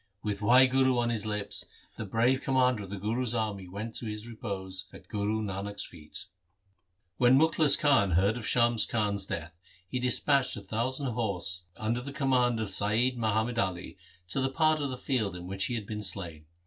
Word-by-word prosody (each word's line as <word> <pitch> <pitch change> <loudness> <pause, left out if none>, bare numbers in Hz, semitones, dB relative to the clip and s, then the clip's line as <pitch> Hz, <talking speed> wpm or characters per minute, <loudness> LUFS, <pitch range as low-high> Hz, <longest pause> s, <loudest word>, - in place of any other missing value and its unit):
With 105 -2 -2
Wahguru 130 +3 +5
on 120 0 +1
his 110 -2 -2
lips 105 -1 -1 0.3
the 110 - -5
brave 120 +6 +2
commander 125 -5 +1
of - - -13
the 100 - -5
Guru's 115 +4 -1
army 105 -4 -2
went 105 +5 -6
to 115 - -4
his 105 +1 -6
repose 95 -4 -5
at - - -14
Guru 105 +1 -1
Nanak's 100 0 -2
feet. 75 0 -9 0.9
When 125 +1 +5
Mukhlis 160 0 +5
Khan 125 - +3
heard 100 +6 +3
of 120 -3 -5
Shams 120 -3 +3
Khan's 100 -3 0
death 85 0 -5 0.3
he 125 - -3
dispatched 130 +1 +2
a - - -6
thousand 125 +6 -2
horse 90 -6 -1
under 115 +4 -1
the 140 +3 -7
command 125 -4 +1
of 110 -2 -2
Saiyid 110 +6 +1
Muhammad 110 +1 0
Ali 95 -4 -2 0.3
to 135 - -1
the 135 - +1
part 155 +2 +2
of 140 -2 -2
the 130 - -5
field 110 -9 -1
in 90 0 -8
which 95 +1 0
he 120 - -2
had 110 -3 -4
been 105 0 -5
slain. 85 -6 -3
110 Hz, 185 wpm, -29 LUFS, 100-125 Hz, 0.9 s, Wahguru